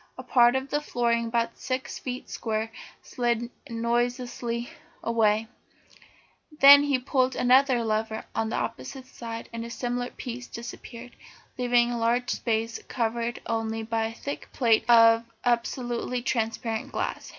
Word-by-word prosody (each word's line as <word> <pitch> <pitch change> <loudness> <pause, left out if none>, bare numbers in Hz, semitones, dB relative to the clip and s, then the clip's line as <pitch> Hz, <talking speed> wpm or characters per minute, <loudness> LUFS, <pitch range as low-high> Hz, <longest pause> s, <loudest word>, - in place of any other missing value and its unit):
A - - -7
part 240 0 +5
of 265 +1 -2
the 295 - +1
flooring 235 -4 0
about 230 0 -1
six 260 0 -3
feet 250 -1 -5
square 220 -1 -3 0.3
slid 240 -1 -1 0.2
noiselessly 240 0 -1 0.4
away; 225 -1 +2 1.1
then 280 +1 +10
he 285 -2 +2
pulled 255 0 +1
another 255 -1 +4
lever 220 0 -2
on 225 0 -1
the - - -2
opposite 260 +3 -4
side 230 -3 -7
and 230 0 -4
a 235 - -7
similar 245 +1 -3
piece 245 0 -7
disappeared, 235 +1 -9 0.4
leaving 245 -1 +2
a 240 - -2
large 240 +2 +1
space 225 0 -1
covered 235 0 -2
only 225 0 -2
by 225 0 -1
a 225 - -7
thick 285 +4 -6
plate 230 -4 +3
of 230 -1 +7 0.2
absolutely 240 0 -1
transparent 225 -2 -2
glass. - - -3
235 Hz, 140 wpm, -27 LUFS, 230-245 Hz, 1.1 s, then